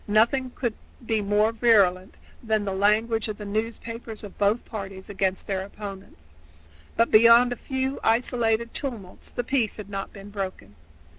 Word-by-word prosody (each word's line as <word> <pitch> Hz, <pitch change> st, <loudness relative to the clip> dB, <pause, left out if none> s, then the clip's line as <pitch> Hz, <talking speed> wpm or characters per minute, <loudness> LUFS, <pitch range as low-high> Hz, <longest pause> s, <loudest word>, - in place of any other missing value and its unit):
Nothing 235 Hz, +5 st, +3 dB
could 240 Hz, -4 st, -1 dB, 0.3 s
be 220 Hz, -1 st, +1 dB
more 205 Hz, +2 st, +2 dB
virulent 200 Hz, -5 st, +3 dB, 0.2 s
than 220 Hz, -3 st, 0 dB
the 195 Hz, -, -2 dB
language 215 Hz, +3 st, +2 dB
of 215 Hz, -1 st, -5 dB
the 210 Hz, -, -7 dB
newspapers 225 Hz, +1 st, -4 dB
of 205 Hz, -, -9 dB
both 205 Hz, +3 st, +2 dB
parties 195 Hz, -3 st, -7 dB
against 190 Hz, -1 st, -1 dB
their 190 Hz, -2 st, -2 dB
opponents, 195 Hz, -, -10 dB, 0.6 s
but 230 Hz, -, +2 dB
beyond 235 Hz, +3 st, +7 dB
a -, -, -6 dB
few 265 Hz, +2 st, -3 dB
isolated 230 Hz, 0 st, +1 dB
tumults 230 Hz, -10 st, -5 dB
the 245 Hz, -, -3 dB
peace 240 Hz, -3 st, 0 dB
had 205 Hz, -2 st, -8 dB
not 195 Hz, 0 st, -4 dB
been 200 Hz, 0 st, -11 dB
broken. 190 Hz, -, -6 dB
215 Hz, 155 wpm, -25 LUFS, 200-230 Hz, 0.6 s, beyond